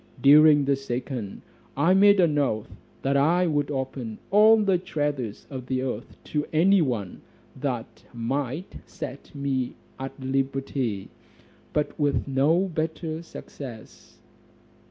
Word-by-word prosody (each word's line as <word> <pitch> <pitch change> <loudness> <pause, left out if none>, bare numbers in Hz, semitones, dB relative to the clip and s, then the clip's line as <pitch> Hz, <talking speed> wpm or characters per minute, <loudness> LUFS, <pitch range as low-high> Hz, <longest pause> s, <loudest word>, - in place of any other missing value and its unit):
During 145 0 +7
the 140 0 +3
second, 125 -5 -5 0.3
I 165 +6 +4
made 200 +1 +6
an 165 -5 +4
oath, 110 -6 -1 0.3
that 135 +1 +1
I 165 +6 +3
would 145 -3 0
open 130 -5 -4
all 215 +2 +7
the 195 -4 +2
treasures 145 - -3
of 130 -2 -6
the 130 0 -1
earth 125 -2 -5
to 150 -1 -2
any 185 +5 +4
one 115 - -2 0.3
that 130 -4 -4
might 135 +7 -3
set 140 +2 -8
me 135 -3 -2 0.2
at 135 +1 -6
liberty; 135 -5 -2 0.6
but 150 +1 -2
with 145 -2 +1
no 140 +6 +3
better 160 -1 -3
success. 130 -8 -11
140 Hz, 125 wpm, -25 LUFS, 130-160 Hz, 0.6 s, During